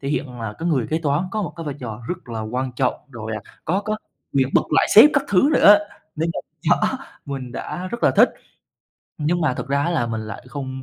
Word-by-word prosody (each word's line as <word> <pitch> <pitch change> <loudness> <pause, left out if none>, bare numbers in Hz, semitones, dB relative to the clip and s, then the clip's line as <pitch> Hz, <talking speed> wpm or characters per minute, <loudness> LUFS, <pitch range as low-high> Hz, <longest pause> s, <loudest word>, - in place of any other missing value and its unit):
thể 140 - -4
hiện 125 -5 -3
là 110 -2 -4
cái 165 - -1
người 135 -9 +1
kế 160 - 0
toán 150 +2 0
có 215 0 -2
một 175 - -4
cái 165 - -6
vai 145 - -3
trò 115 -2 -6
rất 180 -8 -5
là 115 -1 -4
quan 125 +4 -3
trọng, 130 -2 +1 0.2
rồi, 110 -2 -6
à, 110 - -4 0.2
có 185 +5 +1
có 215 0 -1 0.4
quyền 135 -1 +2
bật - - +5
lại - - +4
sếp 260 +8 +10
các 280 -2 +2
thứ 200 +8 +4
nữa - - +4
á, - - +4 0.4
nên 165 +2 0
là, - - -4 0.4
đó, - - +1 0.3
mình 130 -3 -5
đã 185 +7 -5
rất 235 - -5
là - - +6
thích. - - +7 0.9
Nhưng 165 +3 0
mà 150 -6 +1
thực - - -6
ra 140 +1 +1
á 170 - 0
là 155 -9 0
mình 110 -1 -3
lại 110 +2 -7
không 130 -1 -6
140 Hz, 250 wpm, -22 LUFS, 125-175 Hz, 0.9 s, sếp